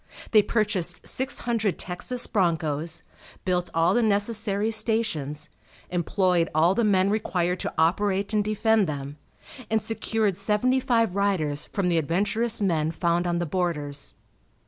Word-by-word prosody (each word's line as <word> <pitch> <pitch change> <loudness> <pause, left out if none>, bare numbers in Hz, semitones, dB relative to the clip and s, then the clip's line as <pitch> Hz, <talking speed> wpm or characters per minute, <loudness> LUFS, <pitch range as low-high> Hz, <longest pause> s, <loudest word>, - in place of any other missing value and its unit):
They 215 - +7
purchased 200 -6 -1
six 260 +1 -2
hundred 225 -5 0
Texas 215 +7 -1
bronchos, 165 -4 -1 0.4
built 180 -1 0
all 165 +3 +2
the 240 - +3
necessary 210 0 0
stations, 215 - 0 0.4
employed 180 0 +1
all 165 +4 +4
the 235 - +1
men 195 -2 +3
required 180 -4 -1
to - - -3
operate 195 +5 +1
and 210 -1 +2
defend 215 -1 +2
them, 145 -1 -5 0.5
and 220 0 +2
secured 220 -2 -1
seventy 210 +6 +1
five 230 -6 +1
riders 165 -8 0
from 195 -3 -2
the 170 -2 +2
adventurous 205 +9 0
men 160 -5 +1
found 170 +1 0
on 175 0 0
the 175 - -1
borders. 150 - -2
190 Hz, 140 wpm, -25 LUFS, 170-215 Hz, 0.5 s, They